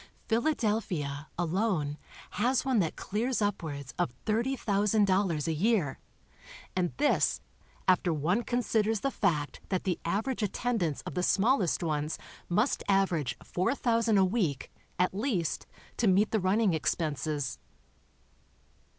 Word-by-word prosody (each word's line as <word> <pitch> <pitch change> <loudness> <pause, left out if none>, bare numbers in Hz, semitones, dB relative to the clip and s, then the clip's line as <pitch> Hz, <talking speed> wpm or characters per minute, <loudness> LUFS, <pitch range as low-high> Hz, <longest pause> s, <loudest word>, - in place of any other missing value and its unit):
Philadelphia, 210 - 0
alone, 175 -4 0 0.4
has 245 +6 +1
one 260 -4 +2
that 165 -5 0
clears 235 +5 -1
upwards 160 -10 -3
of - - +1
$30,000 205 - +1
a 165 - +1
year, 180 - +1 0.8
and 180 -2 +1
this, 290 +1 +2 0.5
after 185 -1 +4
one 165 +8 +1
considers 225 -3 0
the 275 - 0
fact 155 - -1
that 185 -2 0
the 180 -3 -1
average 220 +9 -1
at 205 -3 -1
tendance 210 - -1
of - - -7
the 180 - -1
smallest 195 - +2
ones 150 -1 -1 0.3
must 210 +9 +1
average 185 -8 +1
4,000 230 +2 +1
a 190 - +5
week, 180 - -1 0.3
at 180 +1 +2
least, 195 - -1 0.3
to 230 - +2
meet 195 +3 +4
the 220 - +2
running 195 +1 +2
expenses. 150 -3 -1
195 Hz, 125 wpm, -30 LUFS, 165-225 Hz, 0.8 s, a